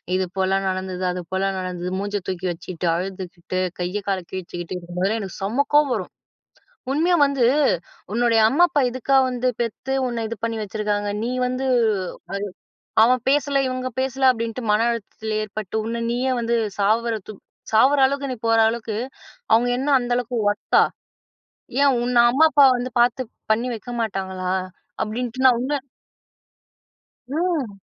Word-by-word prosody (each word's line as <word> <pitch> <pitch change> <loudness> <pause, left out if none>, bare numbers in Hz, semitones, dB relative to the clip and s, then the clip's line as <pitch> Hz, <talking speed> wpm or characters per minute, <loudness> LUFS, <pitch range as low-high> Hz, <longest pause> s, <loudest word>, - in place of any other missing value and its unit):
"இது 190 0 +1
போலலாம் 190 +1 +1
நடந்தது, 185 -1 -3
அது 180 0 -3
போலலாம் 190 0 0
நடந்தது" 180 -1 -4
மூஞ்சை 205 +1 -2
தூக்கி 185 -1 -3
வச்சிட்டு, 175 +1 -6
அழுதுக்கிட்டு, 185 0 -4 0.2
கைய 180 +3 -2
கால 195 -1 +1
கிழிச்சிக்கிட்டு 175 -1 -6
இருக்கும்போதெல்லாம், 180 +5 -2
எனக்கு 195 -3 -7
செம 230 +9 +1
கோவம் 295 -2 +5
வரும். - - -4 0.8
உண்மையா 340 +5 +3
வந்து, 280 -3 +1 0.7
உன்னுடைய 235 -1 +3
அம்மா 295 +9 +4
அப்பா 290 -3 +1
இதுக்கா 260 +2 +1
வந்து 250 0 -1
பெத்து 235 +3 -3
உன்ன 235 -2 -2
இது 230 - -5
பண்ணி 230 -1 -2
வச்சுருக்காங்க? 205 0 -2
நீ 235 - -1 0.2
வந்து, 255 +1 -2
அது 215 -6 +2 1.0
"அவன் 250 +2 +3
பேசல 280 0 +2
இவுங்க 255 0 -3
பேசல 265 0 +2
அப்டின்ட்டு 230 +1 -4
மன 210 +2 +3
அழுத்தத்தில 220 -1 -4
ஏற்பட்டு, 215 -1 -6
உன்னை 230 +1 -3
நீயே 255 +2 0
வந்து 235 0 +1 0.2
சாவுரத்து 215 0 0 0.4
சாவுற 270 +6 +5
அளவுக்கு 280 +1 -1
நீ - - -3
போற 225 0 +4
அளவுக்கு 225 -1 -3 0.6
அவுங்க 240 +2 +4
என்னா 275 +3 0
அந்த 245 0 -4
அளவுக்கு 245 0 -2
ஒர்த்தா? 205 0 +2 1.0
ஏன் 280 -1 +5
உன்ன 250 +1 -1
அம்மா 280 +6 +5
அப்பா 290 -2 +6
வந்து 250 +1 -4
பாத்து 245 +2 +2 0.3
பண்ணி 230 +3 +1
வைக்க 235 +2 -8
மாட்டாங்களா?" 190 -4 -3 0.5
அப்படின்ட்டு 245 +3 -4
நான் 255 - +7
உன்ன, 270 +4 -1 1.5
ம். 295 - -1
225 Hz, 145 wpm, -22 LUFS, 195-255 Hz, 1.5 s, நான்